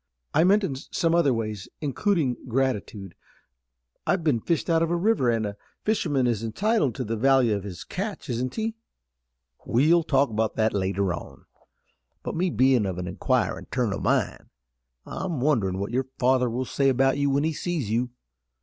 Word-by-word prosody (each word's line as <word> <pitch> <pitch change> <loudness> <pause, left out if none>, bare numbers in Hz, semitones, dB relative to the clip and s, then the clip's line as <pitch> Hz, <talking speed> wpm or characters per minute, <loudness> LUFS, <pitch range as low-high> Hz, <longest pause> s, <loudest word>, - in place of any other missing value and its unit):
"I - - +4
meant 200 +4 +4
in 140 -8 -2
some 165 +4 -1
other 170 -5 +4
ways, 110 -4 -3
including 150 -2 0
gratitude. 115 -7 -2 0.9
I've 180 -3 +1
been 145 -7 +2
fished 165 +8 -1
out 165 -2 +3
of 165 - +1
a 175 - +1
river, 175 - +2
and 115 -2 +1
a 100 0 -5 0.3
fisherman 145 - +1
is 115 -3 0
entitled 165 - +1
to 130 - -3
the 115 0 -2
value 130 -1 +3
of 100 - -3
his 95 -5 -7
catch, 200 +2 -5
isn't 125 +1 -2
he?" 225 0 -1 0.9
"We'll 155 +8 +3
talk 140 -5 +2
about 110 0 -1
that 110 0 +1
later 95 -1 0
on, 85 - -9 0.8
but - - -4
me 180 +3 +1
bein' 130 - +3
of 95 -2 -3
an 90 - -4
inquirin' 120 +7 -1
turn 120 -6 0
o' - - -3
mind, - - 0 0.6
I'm 175 -7 -4
wonderin' 115 -10 +1
what 100 +3 -3
your 130 +2 -1
father 125 -1 +3
will 125 +3 -2
say 135 +2 +1
about 135 +2 +2
you 140 0 +2
when 140 +1 +1
he 160 0 0
sees 155 - -3
you. 120 +2 0
130 Hz, 180 wpm, -25 LUFS, 110-160 Hz, 0.9 s, I